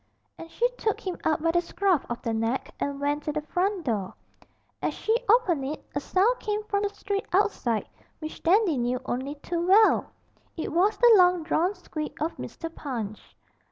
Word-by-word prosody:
And 330 Hz, -, -9 dB
she 475 Hz, +8 st, +1 dB
took 430 Hz, -, 0 dB
him 370 Hz, -2 st, -3 dB
up 310 Hz, -1 st, +1 dB
by 330 Hz, -, +3 dB
the 345 Hz, +1 st, +2 dB
scruff 355 Hz, -2 st, 0 dB
of 240 Hz, -, -5 dB
the 230 Hz, -, -1 dB
neck 225 Hz, +3 st, -2 dB
and 280 Hz, 0 st, -2 dB
went 290 Hz, +1 st, 0 dB
to 300 Hz, -, 0 dB
the 300 Hz, 0 st, -3 dB
front 370 Hz, +3 st, -1 dB
door. 205 Hz, -7 st, -2 dB, 0.7 s
As -, -, -1 dB
she 445 Hz, -, 0 dB
opened 395 Hz, -, +4 dB
it, 290 Hz, +3 st, -5 dB
a 285 Hz, -, 0 dB
sound 395 Hz, -, +2 dB
came 420 Hz, 0 st, -2 dB
from 405 Hz, -1 st, -1 dB
the 410 Hz, -, 0 dB
street 400 Hz, 0 st, -4 dB
outside 360 Hz, -, +1 dB, 0.3 s
which 310 Hz, -1 st, -8 dB
Dandy 355 Hz, -, +3 dB
knew 245 Hz, +1 st, 0 dB
only 260 Hz, +4 st, -3 dB
to 335 Hz, +4 st, -4 dB
well: 390 Hz, +5 st, +5 dB, 0.5 s
it 320 Hz, -, -3 dB
was 395 Hz, +6 st, +2 dB
the 480 Hz, 0 st, +7 dB
long 360 Hz, -2 st, +5 dB
drawn 350 Hz, +4 st, +1 dB
squeak 310 Hz, -4 st, -6 dB
of 320 Hz, +3 st, -2 dB
Mr. 330 Hz, 0 st, -7 dB
Punch. 225 Hz, -9 st, -6 dB
335 Hz, 190 wpm, -27 LUFS, 285-400 Hz, 0.7 s, the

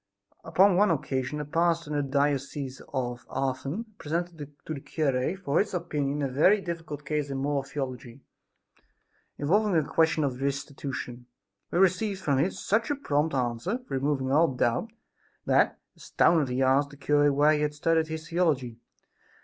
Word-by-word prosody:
Upon 185 Hz, +3 st, +4 dB
one 205 Hz, +1 st, +5 dB
occasion 135 Hz, -2 st, -1 dB
a 150 Hz, -, -3 dB
pastor 165 Hz, +1 st, 0 dB
in -, -, -1 dB
the 145 Hz, -, +2 dB
diocese 140 Hz, -1 st, -1 dB
of 125 Hz, -3 st, -3 dB
Autun, 135 Hz, -, -2 dB
presented 170 Hz, +2 st, -3 dB, 0.3 s
to 155 Hz, -, -4 dB
the 145 Hz, -, -5 dB
cure 140 Hz, +3 st, -1 dB
for 165 Hz, -6 st, 0 dB
his 200 Hz, -2 st, 0 dB
opinion 150 Hz, -4 st, -2 dB
a -, -, +1 dB
very 155 Hz, +11 st, +4 dB
difficult 165 Hz, -5 st, -6 dB
case 150 Hz, -1 st, -1 dB
in 135 Hz, -, -3 dB
moral 140 Hz, +1 st, 0 dB
theology, 135 Hz, -2 st, -6 dB, 1.1 s
involving 200 Hz, +6 st, +2 dB
a 155 Hz, -3 st, +2 dB
question 160 Hz, -1 st, +2 dB
of 130 Hz, -2 st, -2 dB
restitution. 135 Hz, -3 st, -4 dB, 0.4 s
He -, -, -2 dB
received 190 Hz, +2 st, +2 dB
from 140 Hz, -7 st, +1 dB
him 160 Hz, +7 st, +2 dB
such 215 Hz, +4 st, -1 dB
a 290 Hz, -, +1 dB
prompt 150 Hz, -, 0 dB
answer, 125 Hz, -, -1 dB
removing 135 Hz, -1 st, -1 dB
all 160 Hz, +4 st, +5 dB
doubt 125 Hz, -, 0 dB, 0.5 s
that, -, -, +3 dB, 0.2 s
astounded, 155 Hz, -6 st, +2 dB
he 125 Hz, +2 st, 0 dB
asked 135 Hz, +2 st, +3 dB
the 145 Hz, -, -14 dB
cure 145 Hz, 0 st, +3 dB
where 145 Hz, +2 st, +4 dB
he 150 Hz, -, 0 dB
had 150 Hz, 0 st, -1 dB
studied 160 Hz, +2 st, +1 dB
his 160 Hz, 0 st, -6 dB
theology? 150 Hz, -9 st, 0 dB
145 Hz, 160 wpm, -27 LUFS, 135-165 Hz, 1.1 s, one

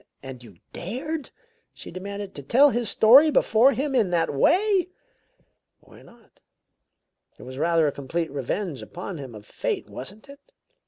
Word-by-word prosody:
"And 135 Hz, -2 st, -9 dB
you 105 Hz, -7 st, -16 dB, 0.2 s
dared," 275 Hz, -, -5 dB, 0.5 s
she -, -, -11 dB
demanded, 200 Hz, +2 st, -7 dB
"to 140 Hz, -, -8 dB
tell 270 Hz, -, +4 dB
his 240 Hz, -3 st, -1 dB
story 265 Hz, +11 st, +6 dB
before 255 Hz, -2 st, +3 dB
him 280 Hz, +1 st, -2 dB
in 225 Hz, -7 st, +2 dB
that 170 Hz, -3 st, 0 dB
way?" 375 Hz, -, +2 dB, 0.9 s
"Why -, -, -18 dB
not? 235 Hz, -2 st, -21 dB, 1.0 s
It -, -, -13 dB
was 130 Hz, +1 st, -9 dB
rather 165 Hz, 0 st, +2 dB
a 145 Hz, -, +1 dB
complete 160 Hz, +4 st, -4 dB
revenge 145 Hz, -, -4 dB
upon 180 Hz, -1 st, -8 dB
him 130 Hz, -5 st, -9 dB
of 105 Hz, -1 st, -12 dB
fate, -, -, -4 dB
wasn't 200 Hz, -, -7 dB
it? 280 Hz, -, -17 dB
200 Hz, 155 wpm, -24 LUFS, -, 1.0 s, story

